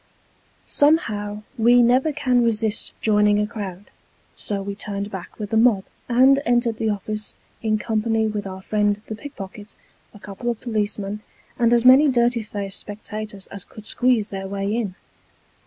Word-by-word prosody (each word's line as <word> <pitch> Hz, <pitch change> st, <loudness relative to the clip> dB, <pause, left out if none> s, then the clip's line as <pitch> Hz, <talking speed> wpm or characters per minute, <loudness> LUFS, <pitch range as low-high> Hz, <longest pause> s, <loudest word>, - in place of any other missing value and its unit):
Somehow, 215 Hz, -9 st, +1 dB, 0.2 s
we 240 Hz, +2 st, +6 dB
never 255 Hz, +6 st, +3 dB
can 255 Hz, -4 st, +2 dB
resist 220 Hz, -1 st, 0 dB
joining 210 Hz, -1 st, +3 dB
a 210 Hz, -, +2 dB
crowd, 205 Hz, -3 st, -7 dB, 0.4 s
so 200 Hz, -2 st, -2 dB
we 200 Hz, 0 st, -4 dB
turned 200 Hz, 0 st, -4 dB
back 190 Hz, -2 st, -8 dB
with 210 Hz, -2 st, -6 dB
the 220 Hz, -, +2 dB
mob, 220 Hz, -4 st, +4 dB, 0.3 s
and 260 Hz, +3 st, +5 dB
entered 240 Hz, -2 st, +1 dB
the 220 Hz, -, 0 dB
office, 210 Hz, +1 st, -4 dB, 0.3 s
in 215 Hz, -1 st, +1 dB
company 220 Hz, 0 st, 0 dB
with 210 Hz, -2 st, -3 dB
our 190 Hz, 0 st, -8 dB
friend 205 Hz, 0 st, +1 dB
the -, -, -6 dB
pickpocket, 210 Hz, -5 st, -9 dB, 0.4 s
a -, -, -14 dB
couple 200 Hz, +5 st, -5 dB
of 235 Hz, -2 st, -2 dB
policemen, 210 Hz, -3 st, -2 dB, 0.4 s
and 235 Hz, -1 st, +3 dB
as 240 Hz, 0 st, +3 dB
many 265 Hz, +4 st, +8 dB
dirty 240 Hz, -2 st, +2 dB
faced 200 Hz, -2 st, -4 dB
spectators 210 Hz, -1 st, -7 dB
as 200 Hz, -2 st, -6 dB
could 215 Hz, -, -13 dB
squeeze 245 Hz, -3 st, +2 dB
their 195 Hz, -1 st, -5 dB
way 200 Hz, +2 st, -2 dB
in. 210 Hz, -6 st, -2 dB
215 Hz, 160 wpm, -22 LUFS, 205-235 Hz, 0.4 s, many